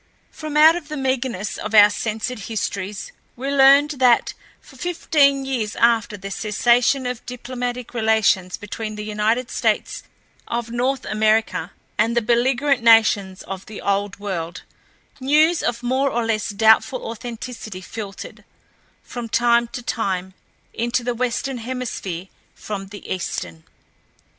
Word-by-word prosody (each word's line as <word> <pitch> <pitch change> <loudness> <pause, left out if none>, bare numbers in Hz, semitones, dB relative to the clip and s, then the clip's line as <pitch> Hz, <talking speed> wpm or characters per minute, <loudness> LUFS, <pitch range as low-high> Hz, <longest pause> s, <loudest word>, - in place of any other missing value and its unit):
From 305 -1 -5
out 315 +2 +8
of 345 -4 -6
the 305 0 -5
meagerness 260 -6 -2
of 215 +1 -3
our 205 0 +8
censored 220 +3 -3
histories 200 -2 -4 0.2
we 270 +3 -3
learned 280 +2 +6
that 245 -2 +4 0.3
for 270 - -18
fifteen 280 -3 +2
years 235 -6 -2
after 230 -3 +2
the 195 0 -7
cessation 240 +6 +2
of 250 -1 -4
diplomatic 245 0 -5
relations 220 -5 +2
between 215 +1 -6
the 210 0 -6
United 215 +4 0
States - - 0 0.5
of 235 -1 -3
North 255 +2 -1
America 215 +1 +1 0.3
and 230 +2 +2
the - - +4
belligerent 255 +4 +2
nations 215 -5 +4
of 190 -1 -7
the 215 - -8
Old 200 -1 -1
World, 175 -4 -5 0.6
news 305 +5 +3
of 240 0 -2
more 260 +3 +1
or 240 -2 -1
less 220 -2 -1
doubtful 220 +3 +3
authenticity 230 -3 -7
filtered, 200 0 -8 0.6
from 240 -2 -7
time 235 +1 +3
to 245 +1 -7
time, 190 -5 -2 0.4
into 240 +1 -1
the 245 0 -1
Western 250 +2 -2
Hemisphere 225 -8 -5 0.3
from 195 -2 -6
the 205 0 -11
Eastern. 85 - -5
235 Hz, 135 wpm, -21 LUFS, 210-255 Hz, 0.6 s, out